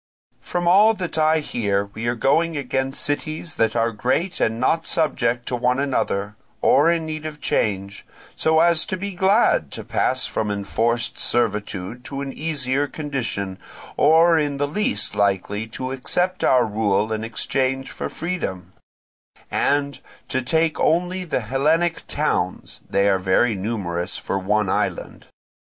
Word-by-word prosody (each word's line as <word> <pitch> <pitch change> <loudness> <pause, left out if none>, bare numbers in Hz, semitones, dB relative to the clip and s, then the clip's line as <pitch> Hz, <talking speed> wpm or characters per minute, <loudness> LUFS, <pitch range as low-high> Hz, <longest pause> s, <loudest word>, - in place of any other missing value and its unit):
From 175 -1 -2
all 210 +5 +6
that 180 -5 -3
I 155 0 +3
hear 100 -8 -1
we 115 +2 -4
are 120 - +1
going 155 +7 +1
against 135 0 -1
cities 155 +2 -3
that 115 +1 +1
are 115 0 +2
great 140 - -1
and 110 +1 0
not 165 +6 +1
subject 120 -7 +1
to 125 - -1
one 125 +1 +1
another, 105 -7 -1 0.3
or 145 +8 +4
in 170 -1 +1
need 155 -1 -5
of 150 -1 -8
change, 100 -5 -1 0.3
so 160 0 +3
as 170 -2 +4
to 185 - -2
be 200 +2 -5
glad 190 - +3
to - - -5
pass 130 0 0
from 110 - -2
enforced 110 +4 -1
servitude 105 -1 -1
to 140 0 -5
an 135 -1 -5
easier 145 -3 -1
condition, 120 -11 -4 0.4
or 165 +2 +5
in 145 -2 -1
the 145 +1 0
least 145 - +1
likely 100 +1 0
to 130 +3 -5
accept 180 +8 0
our 125 -2 +4
rule 105 0 0
in 110 0 -3
exchange 135 +3 -1
for - - -5
freedom; 95 - -4 0.8
and, 140 -2 0 0.3
to 130 - 0
take 160 +5 +1
only 180 +2 +1
the 155 - -1
Hellenic 150 +9 0
towns, - - -2
they 100 0 +2
are 95 -1 +3
very 95 +5 +2
numerous 95 -3 -3
for 95 - -3
one 105 +2 +1
island. - - -2
130 Hz, 150 wpm, -22 LUFS, 105-160 Hz, 0.8 s, all